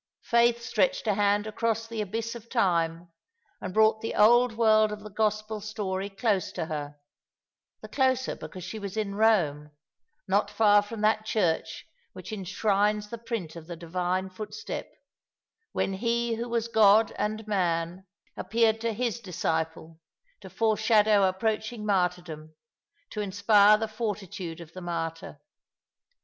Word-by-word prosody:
Faith 235 0 +3
stretched 210 -5 0
a 210 - +2
hand 205 +1 +2
across 225 +1 -1
the 225 -1 -4
abyss 225 +3 -3
of 235 -1 -11
time, 170 -6 0 0.5
and 185 - -4
brought 220 +2 +3
the 225 - -4
old 240 +2 +5
world 215 -2 +4
of 210 0 -6
the 215 0 -10
Gospel 215 +1 -1
story 200 -2 -3
close 200 -1 0
to 170 - -3
her; 145 -2 -5 0.9
the - - -9
closer, 260 -1 +1
because 185 - -9
she 215 +5 -6
was 200 0 -6
in 210 -2 -1
Eome, 180 -9 +2 0.6
not 200 +2 +2
far 205 -1 +4
from 210 +1 -7
that 215 0 +2
church 180 -9 -1 0.3
which - - -9
enshrines 205 +1 0
the 235 - -6
print 225 -9 -5
of 165 -1 -10
the 175 - -6
Divine 180 +3 -2
footstep, 210 +2 -6 0.8
when 195 - -1
He 235 +3 0
who 235 +2 -4
was 235 -1 -1
God 220 -1 +5
and 215 +1 -3
Man, 180 -2 -1 0.3
appeared 225 0 +1
to 230 -1 -1
His 235 0 -2
disciple, 160 -4 -3 0.4
to - - -11
foreshadow 215 -2 +3
approaching 220 +3 -2
martyrdom, 180 -5 -1 0.6
to 210 - -3
inspire 205 +1 +5
the 220 +1 -2
fortitude 195 -6 -5
of 165 -1 -12
the 185 - -8
martyr. 165 -2 -5
210 Hz, 145 wpm, -27 LUFS, 185-220 Hz, 0.9 s, old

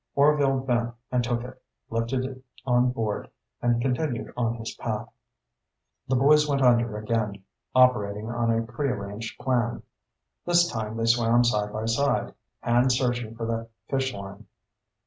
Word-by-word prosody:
Orvil 140 -2 +4
bent 120 -2 -1 0.2
and 125 -1 +2
took 120 0 -1
it, 130 +1 -10 0.3
lifted 115 +3 -1
it 130 -1 -8 0.2
on 125 -1 +3
board, 115 -4 -3 0.3
and 120 -1 +2
continued 125 +1 -1
on 115 -1 0
his 115 -1 -6
path. - - -4 1.0
The 130 - +1
boys 150 +4 +5
went 140 -2 +1
under 120 -3 +3
again, 105 -2 -2 0.3
operating 110 -5 +3
on 120 0 -1
a 115 0 +2
prearranged 115 -4 -4
plan. 120 -3 0 0.6
This 175 0 +4
time 110 -5 -4
they 115 - 0
swam 120 +1 +4
side 105 -3 +1
by 110 +1 -3
side, 120 +5 +1 0.3
hands 120 +1 +3
searching 120 -3 -1
for 115 0 -4
the 115 0 -3 0.2
fish 135 -1 0
line. 100 -1 -9
120 Hz, 145 wpm, -26 LUFS, 115-130 Hz, 1.0 s, boys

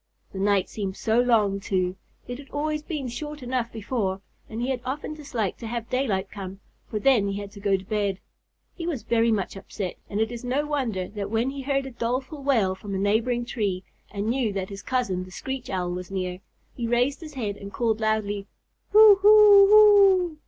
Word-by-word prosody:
The 190 - -5
night 200 -1 +2
seemed 195 -2 -5
so 225 +1 +1
long, 215 -5 +3
too. 185 -2 -1 0.3
It 245 +1 -6
had 280 - -12
always 300 +1 -2
been 300 -4 -4
short 295 +4 -6
enough 245 -1 -2
before, 205 -3 -2 0.3
and 220 - -6
he 245 +2 -1
had 255 -2 -2
often 275 +4 -4
disliked 275 -10 -4
to 230 - -6
have 235 +1 -5
daylight 205 -7 -1
come, 195 -1 -7 0.3
for 215 - -3
then 215 -2 +3
he 200 0 -3
had 200 -1 -7
to 205 - -12
go 200 -1 +2
to 190 - -11
bed. 200 -2 -1 0.5
He 335 - -6
was 295 -9 -3
very 230 0 +2
much 200 -3 -1
upset, 195 -1 -6
and 205 - -2
it 220 +1 0
is 240 0 -7
no 260 +4 0
wonder 245 -11 -2
that 200 -1 -5
when 230 +4 0
he 275 0 -6
heard 275 0 -1
a 265 - -7
doleful 255 +5 -3
wail 230 -9 +2
from 195 +1 -7
a - - 0
neighboring 225 +5 +1
tree, 200 -7 -2 0.3
and 200 0 -4
knew 235 -1 0
that 190 -1 -3
his 195 -1 -8
cousin, 220 -8 -1
the 185 - -12
Screech 265 +6 -6
Owl, 180 -2 -2
was 180 0 -6
near, 185 -2 -3 0.3
he 235 -2 -4
raised 245 +5 +1
his 310 -3 -10
head 210 -6 -3
and 200 0 -9
called 225 -1 0
loudly, 210 -2 -1 0.5
"Hoo 425 -1 +9
hoo 415 -1 +8 0.6
oooo! 305 - -16
225 Hz, 210 wpm, -25 LUFS, 200-265 Hz, 0.6 s, Hoo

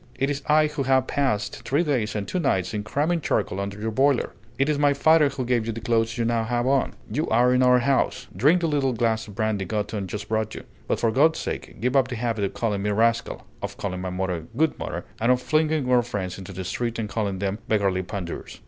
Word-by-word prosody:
It 135 +2 +1
is 140 -1 -3
I 155 +1 +5
who 150 -1 -3
have 130 -1 +3
passed 130 -8 -1
three 145 +5 +1
days 125 -10 -1
and 100 -2 -3
two 185 - -1
nights 95 - 0
in 105 - -1
cramming 155 +9 0
charcoal 100 -7 -1
under 100 +1 -4
your 110 +1 -2
boiler. 135 +3 +2 0.3
It 135 - +2
is 150 -2 +1
my 145 -1 +3
father 155 0 +5
who 130 -2 -4
gave 120 -2 0
you - - 0
the 115 - -5
clothes 115 0 0
you 115 - 0
now 115 -1 +1
have 120 +2 -1
on. 135 0 +1 0.2
You 155 - -1
are 125 +3 +4
in 125 - +3
our 125 0 +6
house. 130 0 +1
Drink 150 - +4
the 165 - +1
little 140 -4 +1
glass 115 -1 0
of 100 - -11
brandy 110 -2 0
Gothon 105 0 -3
just 105 +3 -6
brought 110 0 -1
you; - - -7 0.2
but - - 0
for 115 - +2
God's 155 +7 +4
sake - - -5
give 125 +3 0
up 135 -2 +4
the 130 - -5
habit 115 -3 -1
of 100 0 -5
calling 105 -2 -1
me 105 - -1
rascal, 115 +2 +1 0.2
of - - -5
calling 90 -2 -4
my 95 - -3
mother 90 -3 -3
'Good 160 +1 +1
Mother,' - - -4
and 115 +3 +3
of 125 - +3
flinging 155 0 +1
our 125 -1 +5
friends 100 -6 -4
into 95 0 -8
the 95 0 -5
street 115 +5 -3
and 110 -2 -2
calling 100 -1 -2
them 100 +2 -2
beggarly 100 -4 +1
pandours!" 90 -2 -6
115 Hz, 245 wpm, -24 LUFS, 105-135 Hz, 0.3 s, our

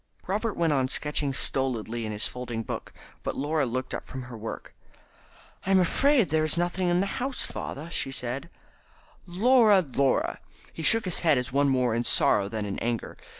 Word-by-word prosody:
Robert 210 +3 -1
went 165 -3 +2
on 130 -2 +2
sketching 145 +1 -1
stolidly 120 -4 -2
in - - -4
his 105 0 -2
folding 120 -2 -5
book, - - -6 0.3
but - - -4
Laura 145 0 0
looked 130 +2 -3
up - - -4
from 130 -1 -7
her 125 -1 -9
work. 110 0 -7 0.9
"I'm 190 0 +4
afraid 255 - +3
there 155 0 +2
is 155 +1 +2
nothing 175 +1 0
in 175 +1 +3
the - - +1 0.2
house, 265 +1 -1
father," 150 +4 -6
she 135 - 0
said. 130 +5 -3 0.8
"Laura! 215 +2 +5
Laura!" 135 -3 0 0.3
He - - -7
shook 225 +8 +3
his 185 - +1
head 155 -5 +3
as 125 0 -3
one 140 0 +3
more 125 -3 +2
in 120 +1 0
sorrow 100 -4 +3
than 110 -1 -3
in 100 -1 -4
anger. 120 -1 -3
140 Hz, 185 wpm, -27 LUFS, 125-175 Hz, 0.9 s, Laura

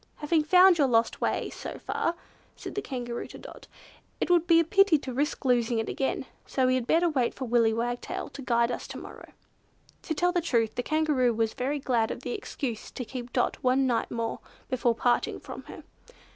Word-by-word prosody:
"Having 305 +1 +1
found 360 +1 +6
your 280 - +5
lost 230 -2 +1
way - - -1
so - - -7
far!" 335 - -2 0.4
said - - -8
the 410 - -2
Kangaroo 245 -6 -5
to - - -11
Dot, - - -12 0.5
"it - - 0
would 345 -1 +4
be 330 -1 +6
a - - +4
pity 390 0 +4
to 265 -3 -6
risk 290 +3 -2
losing 240 -2 +2
it 225 - -1
again, 265 -1 -2 0.2
so 260 - +1
we 255 - +3
had 255 -2 -1
better 340 +2 +3
wait 265 -7 0
for 265 - -4
Willy 230 -2 +3
Wagtail 240 +2 -3
to 280 - -9
guide 235 -2 +2
us - - -5
to - - -7
morrow." - - -11 0.7
To 315 - -3
tell 355 +3 +2
the 350 -1 +1
truth, 230 -9 +1
the - - -2
Kangaroo 290 -5 +1
was 225 -1 0
very 275 +4 -2
glad 245 -5 +1
of - - -5
the 250 - -4
excuse 240 -2 -4
to 250 - -6
keep 245 +1 -7
Dot 245 - 0
one 260 +1 +3
night 240 -3 0
more 230 -1 -3 0.3
before 245 -2 +1
parting 240 +1 +1
from - - -9
her. - - -10
255 Hz, 210 wpm, -28 LUFS, 235-310 Hz, 0.7 s, found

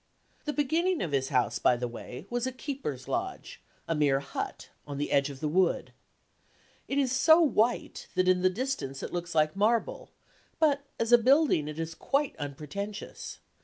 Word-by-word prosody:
The 300 - 0
beginning 325 +5 +1
of 165 - -3
his 135 -1 0
house, 120 -2 +1
by 125 - +4
the 125 0 -2
way, 125 +5 -8
was 245 +1 -1
a - - -2
keeper's 255 - -5
lodge, 375 +2 -4 0.3
a 165 - +1
mere 145 -3 +3
hut, 140 - -5 0.2
on 140 -1 -5
the 145 - -2
edge 140 0 +3
of 135 -2 -9
the 155 - 0
wood. 180 +4 +1 0.9
It 275 - -2
is 270 -3 +2
so 315 +6 +6
white 245 -7 +1
that 185 0 +2
in 185 0 +4
the 185 - +4
distance 190 - -3
it - - -5
looks 175 -1 -4
like 155 +1 +3
marble, 220 +3 +1 0.5
but 290 -3 +3 0.2
as 230 +1 0
a 240 - +9
building 260 - +4
it 150 0 -6
is 165 0 -3
quite 280 - 0
unpretentious. 155 +9 -6
185 Hz, 180 wpm, -29 LUFS, -, 0.9 s, a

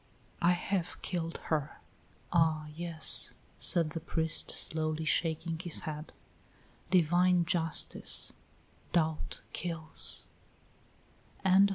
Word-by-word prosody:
I 175 +1 +4
have 180 0 -3
killed 170 -2 -3 0.2
her!" 150 -1 -2 0.5
"Ah, 160 -2 +2
yes," 165 -1 +2 0.2
said 165 -3 +2
the 165 - -4
priest, 160 0 +2
slowly 155 0 0
shaking 165 0 -1
his 175 -1 +1
head. 155 0 -6 0.8
"Divine 175 0 +3
Justice 165 -2 +1 0.6
Doubt 160 -2 -1
kills." 165 -2 +1
165 Hz, 85 wpm, -31 LUFS, 155-175 Hz, 0.8 s, I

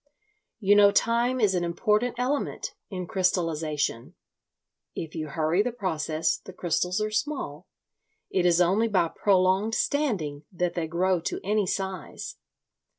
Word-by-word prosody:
You 205 -1 +4
know 205 0 +7
time 235 +4 +2
is 210 -4 +3
an 180 -1 0
important 210 +8 +1
element 260 +4 -2 0.2
in 185 -2 -4
crystallisation. 160 -8 -1 0.8
If 160 -1 -5
you 155 -2 -4
hurry 160 +5 +1
the 245 +3 -1
process 160 -8 -1
the 190 - -12
crystals 180 +2 0
are 215 0 -1
small—it 215 -6 -5
is 175 -1 +4
only 190 +6 +3
by 180 -6 +2
prolonged 195 +4 +2
standing 195 - -1
that 180 0 -1
they 170 -2 -2
grow 180 +2 +1
to - - -3
any 205 0 +1
size. 190 -2 -4
185 Hz, 135 wpm, -27 LUFS, 170-215 Hz, 0.8 s, know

